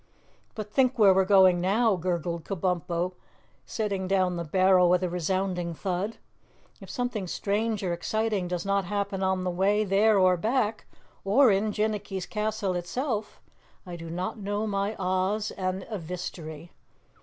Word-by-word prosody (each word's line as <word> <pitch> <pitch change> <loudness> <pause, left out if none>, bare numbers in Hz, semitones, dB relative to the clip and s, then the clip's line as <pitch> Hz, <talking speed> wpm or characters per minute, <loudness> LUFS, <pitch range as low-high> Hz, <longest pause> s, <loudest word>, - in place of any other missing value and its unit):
"But 210 -1 -7
think 260 -1 +3
where 200 -4 +7
we're 190 0 +3
going 185 -3 +5
now," 210 +3 +2
gurgled 170 -2 -2
Kabumpo, 180 -1 -2 0.5
setting 200 -4 -2
down 185 -2 +1
the 170 - -3
barrel 185 +2 +4
with 180 +1 +3
a 180 - 0
resounding 180 0 -2
thud. 190 +5 -3 0.6
"If - - -12
something 245 -6 -3
strange 210 +3 -1
or 180 -2 0
exciting 210 +1 -1
does 175 0 -3
not 200 -1 +1
happen 200 0 -2
on 190 -1 0
the 180 - -1
way 200 +4 +2
there 210 +2 +3
or 185 -1 +4
back, 220 +2 -1 0.4
or 235 +5 +5
in 205 +2 +1
Jinnicky's 210 -3 -2
castle 210 -2 -2
itself, 215 - -3 0.5
I 175 -1 -7
do 165 -1 -8
not 180 +6 -4
know 205 +1 -2
my 200 0 -1
Oz 185 +3 0
and 185 0 -3
Evistery. 170 -3 -6
190 Hz, 150 wpm, -27 LUFS, 180-210 Hz, 0.6 s, where